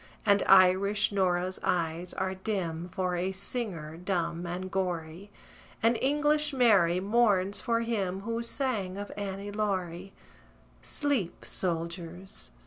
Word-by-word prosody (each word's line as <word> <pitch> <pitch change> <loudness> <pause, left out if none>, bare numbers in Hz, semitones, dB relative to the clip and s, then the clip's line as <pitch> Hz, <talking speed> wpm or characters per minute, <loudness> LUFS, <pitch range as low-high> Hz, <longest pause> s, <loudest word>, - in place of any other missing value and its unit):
And 200 -1 +4
Irish 195 +3 +5
Nora's 185 -2 0
eyes 170 0 -1
are 190 0 -1
dim 185 -4 -3
For 185 -1 -1
a 180 +2 -1
singer, 190 -6 -4
dumb 175 -1 -2
and 185 +2 -4
gory; 180 0 -3 0.5
And 230 +1 +4
English 295 +2 +3
Mary 200 -9 +4
mourns 200 -2 +2
for 230 -2 +1
him 195 -5 -2
Who 230 +2 -2
sang 230 -6 -1
of 205 0 -6
"Annie 200 0 -5
Laurie." 190 -3 -2 0.7
Sleep, 275 - -2
soldiers! 170 +2 -4
190 Hz, 120 wpm, -29 LUFS, 175-210 Hz, 0.7 s, Irish